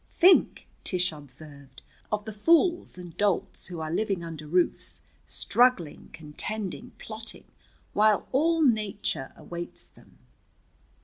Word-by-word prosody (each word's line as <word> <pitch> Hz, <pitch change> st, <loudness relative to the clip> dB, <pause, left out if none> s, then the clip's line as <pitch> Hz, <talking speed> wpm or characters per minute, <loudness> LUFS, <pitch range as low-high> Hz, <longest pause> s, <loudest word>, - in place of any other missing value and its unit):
"Think," 370 Hz, +2 st, +5 dB, 0.2 s
Tish 180 Hz, -1 st, +1 dB
observed, 140 Hz, -1 st, -11 dB, 0.3 s
"of 210 Hz, -1 st, -1 dB
the 220 Hz, -, -6 dB
fools 335 Hz, -, +3 dB
and 175 Hz, -2 st, -9 dB
dolts 205 Hz, -3 st, 0 dB
who 175 Hz, -3 st, -6 dB
are 155 Hz, 0 st, -3 dB
living 195 Hz, -2 st, 0 dB
under 160 Hz, -2 st, -7 dB
roofs, 175 Hz, +3 st, 0 dB, 0.2 s
struggling, 245 Hz, -11 st, +2 dB
contending, 195 Hz, +9 st, -5 dB
plotting, 220 Hz, 0 st, -6 dB, 0.5 s
while 210 Hz, 0 st, +4 dB
all 325 Hz, +4 st, +3 dB
Nature 210 Hz, -, 0 dB
awaits 175 Hz, 0 st, -8 dB
them." -, -, -21 dB
195 Hz, 115 wpm, -27 LUFS, 160-220 Hz, 0.5 s, Think